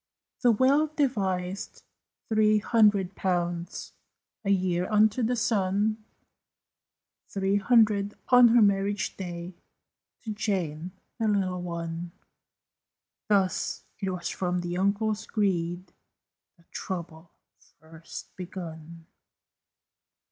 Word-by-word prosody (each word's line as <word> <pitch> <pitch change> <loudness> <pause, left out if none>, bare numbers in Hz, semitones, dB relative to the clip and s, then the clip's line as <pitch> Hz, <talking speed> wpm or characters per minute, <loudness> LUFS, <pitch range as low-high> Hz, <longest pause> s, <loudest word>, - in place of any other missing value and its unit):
The 245 - +5
will 270 +7 +3
devised 195 -11 -2 0.4
three 215 -1 +4
hundred 210 -4 +3
pounds 175 -2 -2 0.5
A 200 - -2
year 185 -2 +1
unto 215 +2 +3
the 240 +2 +1
son, 215 -1 0 1.3
Three 195 0 +1
hundred, 210 -2 +3
on 245 -1 +8
her 230 -1 +5
marriage 200 0 +1
day, 175 -1 -6 0.7
To 220 - -4
Jane, 180 -6 -2 0.3
the 225 - +1
little 190 -3 0
one. 170 0 -5 1.1
Thus 195 -3 +1 0.2
it 195 -2 -2
was 180 -2 -4
from 180 -1 -1
the 175 0 -4
uncle's 210 +3 0
greed 180 -4 -1 0.6
That 170 - -28
trouble 170 -2 -6 0.5
first 160 +1 -11
begun. 165 -3 -8
195 Hz, 95 wpm, -27 LUFS, 175-215 Hz, 1.3 s, on